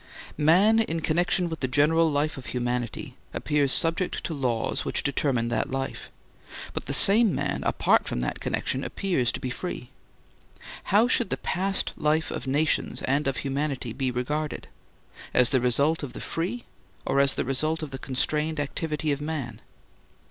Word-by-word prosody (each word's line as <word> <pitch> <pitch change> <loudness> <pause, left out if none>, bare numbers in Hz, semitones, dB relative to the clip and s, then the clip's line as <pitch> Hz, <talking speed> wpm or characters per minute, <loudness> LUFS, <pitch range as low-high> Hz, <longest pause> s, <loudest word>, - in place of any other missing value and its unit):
Man 190 +9 +4
in 165 -7 -1
connection 175 +3 +1
with 160 -2 -5
the 130 - -1
general 155 +5 +3
life 150 +2 0
of 135 - -10
humanity 120 -1 -3 0.2
appears 145 -2 0
subject 165 +5 +1
to 165 - -3
laws 125 -6 -1
which - - -1
determine 135 -5 0
that 120 - -1
life. 135 0 -5 0.6
But - - -5
the - - -1
same 215 0 +8
man - - -2
apart - - +2
from - - -3
that 60 - -3
connection 130 +1 -2
appears 175 -12 -1
to - - -4
be 125 - -4
free. 125 -4 -6 0.9
How 215 +5 +3
should 240 -4 +1
the - - -1
past 195 +1 -1
life 155 +1 0
of - - -6
nations 150 +4 0
and 140 +2 0
of 135 - -1
humanity 135 -3 -3
be 130 0 -2
regarded—as 125 -1 -2
the 130 -3 +2
result 140 +6 +2
of 145 -4 -7
the - - -8
free, 185 +9 -4 0.4
or 140 - +1
as 140 -1 +3
the - - -2
result 155 +5 0
of 150 - -6
the 135 - -6
constrained, 150 +4 -1
activity 150 +1 -2
of 140 0 -2
man? 150 -4 -5
150 Hz, 165 wpm, -26 LUFS, 130-165 Hz, 0.9 s, same